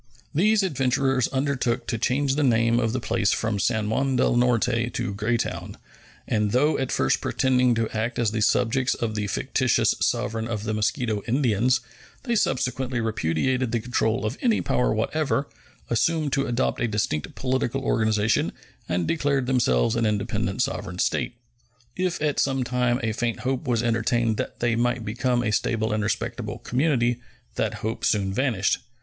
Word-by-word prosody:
These 210 +6 +3
adventurers 135 -5 +1
undertook 130 -3 -1
to 115 - -2
change 135 +4 +1
the 150 - 0
name 115 -3 +3
of 115 -2 +1
the 130 - -1
place 110 -3 +1
from 110 -2 -1
San 110 +1 0
Juan 135 +5 0
del 120 - +2
Norte 120 -1 +2
to 120 -4 -3
Greytown, 110 +3 -2 0.5
and 105 -2 +1
though 145 +5 +3
at 135 - -2
first - - +1
pretending 125 -2 +2
to 115 -1 0
act 115 +2 -2
as 115 -3 +1
the 110 -1 -2
subjects 125 +4 +2
of 115 -2 -2
the 105 -1 -2
fictitious 130 +4 +1
sovereign 115 0 -1
of 110 -3 -3
the 110 0 -2
Mosquito 110 0 0
Indians, 120 -1 +2 0.4
they 240 -3 0
subsequently 130 - 0
repudiated 115 +4 0
the 120 - +1
control 115 0 0
of 110 +6 -3
any 235 -4 +2
power 125 - +1
whatever, 140 +5 0 0.4
assumed 145 +5 +1
to 140 - +1
adopt 120 0 0
a 120 - +2
distinct 100 -9 -2
political 130 0 -1
organization, 110 -2 +1 0.4
and 90 -1 0
declared 140 -4 +1
themselves 115 - +2
an 115 -1 +1
independent 105 0 -1
sovereign 90 -9 -4
state. 115 - 0 0.6
If 180 -1 -1
at 150 -2 +1
some 135 -1 +1
time 125 0 0
a 115 - +1
faint 115 +1 -2
hope 130 +2 -2
was 120 -2 +1
entertained 115 -1 +1
that - - -5
they 120 -1 +2
might 120 0 0
become 120 +2 0
a 110 - 0
stable 110 +1 0
and 110 - 0
respectable 105 0 -3
community, 125 -3 +1 0.4
that 110 -1 -2
hope 110 - -3
soon 95 -2 +1
vanished. 110 -5 +1
120 Hz, 165 wpm, -25 LUFS, 110-130 Hz, 0.6 s, These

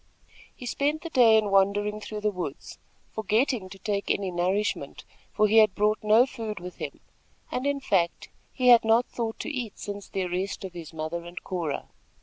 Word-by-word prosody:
He 250 - -9
spent 290 +6 -1
the 335 - -6
day 235 -5 +6
in 210 -2 +1
wandering 205 +2 +2
through 210 0 -6
the 210 0 +1
woods, 175 -7 -6 0.3
forgetting 220 0 0
to 195 - -10
take 200 +1 -2
any 195 -2 0
nourishment, 185 +4 -1 0.3
for 215 0 +3
he 220 +2 +3
had 215 -3 +6
brought 210 +1 +2
no 215 +3 +6
food 225 -6 -6
with 180 +1 -9
him, - - -6 0.5
and, 255 +3 -1
in 285 0 0
fact, 185 -10 0 0.2
he 250 -2 +2
had 240 -1 +8
not 225 +2 +4
thought 225 -2 -4
to - - -4
eat 245 -7 -4
since 205 -1 -6
the 190 - -2
arrest 185 +3 -3
of 185 - -8
his 170 -3 -8
mother 160 +1 -4
and 175 +1 -9
Cora. 170 -6 -3
210 Hz, 190 wpm, -27 LUFS, 185-225 Hz, 0.5 s, had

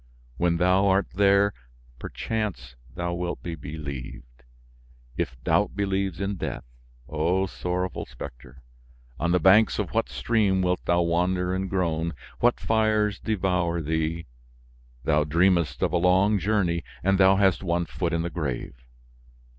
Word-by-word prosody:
When 85 -1 +1
thou 90 +3 +3
art 95 +1 +2
there, 100 +1 +4 0.5
perchance 90 - -4 0.2
thou 85 0 -2
wilt 85 0 -4
be 85 - -4
believed, 70 -6 -8 0.7
if 65 - -2
doubt - - +1
believes 95 -3 -1
in 100 0 -2
death. - - -4 0.4
O 85 +6 0
sorrowful 90 -1 -3
specter! 60 +1 -11 0.6
On 85 - 0
the 90 - +3
banks 95 +6 +5
of 105 -4 -2
what 115 +1 0
stream 100 -5 +1
wilt 90 0 0
thou 85 0 +2
wander 90 +2 0
and 95 0 -2
groan? 85 -3 -1 0.2
What 120 0 +3
fires 110 -2 +1
devour 90 -5 0
thee? 80 +1 -2 0.8
Thou 75 0 +2
dreamest 85 -2 +2
of - - 0
a - - +3
long 95 +4 +3
journey 90 -4 0 0.2
and 95 0 +2
thou 95 0 +6
hast 95 -2 +3
one 85 -1 0
foot 85 0 -3
in 85 -1 0
the 85 - -3
grave! 70 -10 -4
90 Hz, 140 wpm, -25 LUFS, 85-95 Hz, 0.8 s, thou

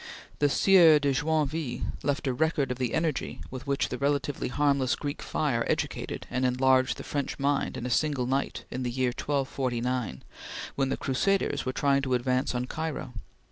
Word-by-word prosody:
The 145 - +4
Sieur 170 -1 +6
de 145 -2 +1
Joinville 150 -2 -1 0.2
left 145 +2 -1
a 130 - +1
record 150 -1 +1
of 125 - -4
the 125 -3 0
energy 160 -3 -1
with 130 +2 -7
which 140 -1 0
the 125 - -4
relatively 140 0 0
harmless 140 0 +2
Greek 145 0 -5
fire - - 0
educated - - -2
and 125 +1 -1
enlarged 130 +1 +3
the - - -7
French 140 -2 -3
mind 140 0 0
in 120 - -5
a 125 - -2
single 140 0 +1
night 135 +2 -1
in 130 - -3
the 125 - -1
year 125 +1 0
1249, 125 - -2 0.5
when 135 -1 0
the - - -1
crusaders 190 +3 0
were - - +1
trying 140 0 +2
to 130 -2 0
advance 125 +1 0
on 125 0 -1
Cairo. 155 -3 -4
135 Hz, 180 wpm, -28 LUFS, 125-145 Hz, 0.5 s, Sieur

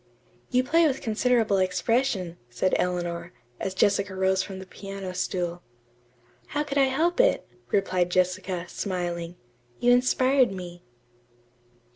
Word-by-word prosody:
"You 250 0 +3
play 330 +5 +4
with 270 -2 -1
considerable 225 -2 +2
expression," 185 -1 0
said 125 +10 0
Eleanor, 175 -1 -2 0.3
as 190 -1 -3
Jessica 200 0 +2
rose 190 0 +2
from 190 0 -6
the 190 - -8
piano 195 -1 -7
stool. 175 -1 -2 1.0
"How 295 - +2
could 285 -1 -1
I 270 - +6
help 320 - +1
it?" - - +3 0.2
replied 185 -3 +1
Jessica, 185 0 0
smiling. 175 -2 -3 0.4
"You 245 - +4
inspired 255 0 +4
me." 175 -2 -8
190 Hz, 125 wpm, -26 LUFS, 180-250 Hz, 1.0 s, I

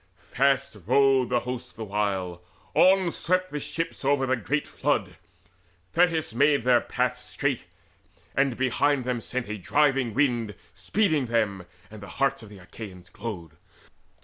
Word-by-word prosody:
] - - -39 0.2
Fast 135 -3 +2
rowed 135 0 +4
the 120 -1 +1
host 125 0 -6
the 110 - -6
while; 95 -4 -2 0.3
on 185 -1 +5
swept 185 +2 0
the 150 - -3
ships 165 +2 -4
Over 135 0 +2
the 130 0 +2
great 135 +6 -2
flood: - - -1 0.8
Thetis 165 -6 +2
made 140 +1 +3
their 125 -1 +4
paths - - -1
Straight, - - -2 0.7
and 135 -3 +1
behind 130 +2 +1
them 125 -1 -2
sent 125 +1 -3
a 105 0 -5
driving 135 +3 +2
wind 120 -7 +1 0.2
Speeding 160 - +1
them, 105 -6 0 0.2
and 110 -1 -10
the 100 - -9
hearts 135 0 +1
Achaean 100 -2 -11
glowed. 100 -8 -6
125 Hz, 145 wpm, -26 LUFS, 110-140 Hz, 0.8 s, on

